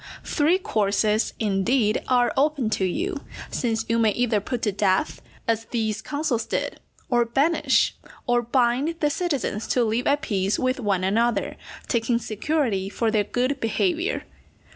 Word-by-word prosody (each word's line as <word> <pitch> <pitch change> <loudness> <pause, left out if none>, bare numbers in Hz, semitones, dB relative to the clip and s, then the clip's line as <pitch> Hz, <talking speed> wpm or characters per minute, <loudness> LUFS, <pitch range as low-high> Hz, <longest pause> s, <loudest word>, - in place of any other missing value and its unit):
Three 310 +5 +2
courses, 215 - +1
indeed, 215 +2 +1
are 245 -1 +3
open 275 -5 +1
to 195 - +1
you, 330 - -2 0.3
since 225 -2 -1
you 230 +1 +1
may 225 -1 +4
either 240 -3 +1
put 235 +4 -4
to 210 - +2
death, 190 -1 0 0.3
as 225 0 0
these 220 -2 -2
consuls 255 -5 -2
did, - - -2 0.3
or 240 -2 +3
banish, 275 +4 +2 0.3
or 245 0 +2
bind 250 +6 +1
the 295 -1 +2
citizens 280 - -2
to 250 - +2
live 225 +2 0
at 290 +2 +2
peace 195 -6 0
with 255 +1 0
one 200 -5 0
another, 230 +5 +1 0.3
taking 235 0 +1
security 220 -3 -1
for 225 +2 0
their 215 -2 +2
good 255 +5 -1
behaviour. 340 - 0
235 Hz, 150 wpm, -24 LUFS, 215-275 Hz, 0.3 s, may